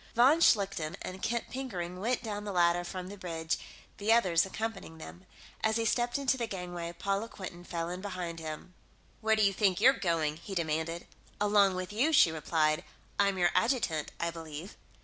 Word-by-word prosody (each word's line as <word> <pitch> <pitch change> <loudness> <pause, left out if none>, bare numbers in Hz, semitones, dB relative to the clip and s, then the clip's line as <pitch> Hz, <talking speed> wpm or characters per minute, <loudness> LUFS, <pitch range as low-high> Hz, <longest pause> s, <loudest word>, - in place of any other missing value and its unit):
Von 265 +7 +6
Schlichten 195 - +3
and 185 +1 -6
Kent 235 0 -2
Pickering 180 -9 -4
went 240 +5 0
down 210 -2 -4
the 205 - -4
ladder 175 -1 +3
from 180 +1 -6
the 200 +1 -9
bridge, 165 -3 -2 0.4
the 210 +2 +1
others 185 -7 +4
accompanying 195 -5 -5
them. 175 +3 -11 0.4
As 220 0 +2
he 230 0 +1
stepped 240 +2 +1
into 270 -2 +1
the 235 -2 -2
gangway, 175 -4 -5
Paula 200 +5 -2
Quinton 180 -4 -8
fell 170 -1 -3
in 180 +1 -5
behind 180 -4 -4
him. 160 +3 -7 0.5
"Where 220 -1 +3
do 215 - +2
you 200 -1 +4
think 195 -2 +2
you're 255 +5 +7
going?" 165 - 0
he 195 +4 -8
demanded. 165 0 -1 0.3
"Along 205 -2 +4
with 185 +2 -4
you," 265 +9 +2
she 175 - +7
replied. 155 +1 +1 0.4
"I'm 200 -1 +3
your 175 -1 +3
adjutant, 225 - +1
I 170 0 0
believe." 165 +2 -8
185 Hz, 185 wpm, -31 LUFS, 170-220 Hz, 0.5 s, you're